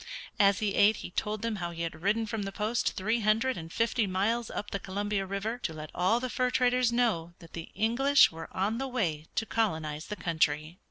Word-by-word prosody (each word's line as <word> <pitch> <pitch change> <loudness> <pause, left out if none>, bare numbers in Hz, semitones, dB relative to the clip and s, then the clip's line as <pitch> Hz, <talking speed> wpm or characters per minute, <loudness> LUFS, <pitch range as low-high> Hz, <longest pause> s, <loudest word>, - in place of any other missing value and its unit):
As 200 -1 +5
he 210 -2 -1
ate 210 +2 +5
he - - -8
told 210 +3 -2
them 230 -2 -1
how 175 -2 -3
he 170 0 -5
had 160 -1 -5
ridden 215 +4 +1
from 220 0 -3
the 195 -1 -4
post 215 +4 0
three 220 +5 0
hundred 225 +4 +2
and 165 0 -8
fifty 230 0 +1
miles 215 +5 0
up 205 - -5
the 200 - -2
Columbia 200 +1 -2
River 205 +5 -3
to 165 - -3
let 155 -1 -8
all 185 +7 +2
the 255 - -2
fur 250 0 0
traders 250 -1 +2
know 215 -9 +1
that 165 -3 -15
the 165 -1 -7
English 250 +7 +4
were 165 0 -8
on 210 +5 -1
the 270 - -2
way 170 - -2
to 225 - 0
colonize 160 -10 -1
the 210 - -4
country. 160 -2 0
205 Hz, 220 wpm, -29 LUFS, 170-230 Hz, -, As